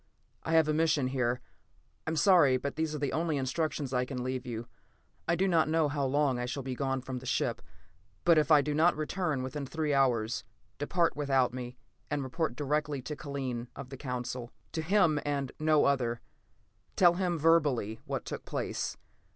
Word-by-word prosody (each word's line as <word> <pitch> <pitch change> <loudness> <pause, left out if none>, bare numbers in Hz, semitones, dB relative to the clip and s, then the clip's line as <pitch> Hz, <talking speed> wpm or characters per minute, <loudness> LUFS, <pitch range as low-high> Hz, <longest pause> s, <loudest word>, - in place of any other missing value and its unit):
"I 165 - -3
have 160 -2 +5
a 155 - +2
mission 150 -4 +2
here. 125 -2 0 0.7
I - - +2
am 160 - -1
sorry, 155 -6 +5
but 140 +2 -4
these 160 0 -1
are - - -2
the 145 -1 -2
only 160 -2 0
instructions 140 0 -2
I 125 0 +2
can 125 -1 -4
leave 130 0 -3
you. 115 -1 -4 0.6
"I 170 - +3
do 190 +3 +1
not 165 -4 +3
know 160 -2 +2
how 145 -1 -1
long 140 -2 +1
I 125 - -2
shall 135 +2 -4
be 130 0 -3
gone 135 0 -1
from 130 0 -5
the 130 - -10
ship, - - 0 0.6
but 170 -2 +6
if 150 - +1
I 150 -2 +7
do 150 - -1
not 160 +2 +3
return 155 -3 -1
within 140 +3 -4
three 150 +2 -1
hours, 125 -4 +2 0.4
depart 170 +4 +1
without 135 -4 +2
me, 125 -1 -6 0.3
and 145 -2 -1
report 130 0 -2
directly 145 -1 -1
to 150 - -5
Kellen 130 -5 -4
of 130 - -8
the 135 - -7
Council. 125 -2 -4 0.2
To 160 - -2
him, 165 -3 +3
and 140 -2 -2
no 155 -1 +4
other. 120 -4 +1 0.8
Tell 175 -2 +6
him, 175 -1 0
verbally, 145 -9 +2
what - - -3
took - - -5
place. - - -3
145 Hz, 190 wpm, -30 LUFS, 130-155 Hz, 0.8 s, I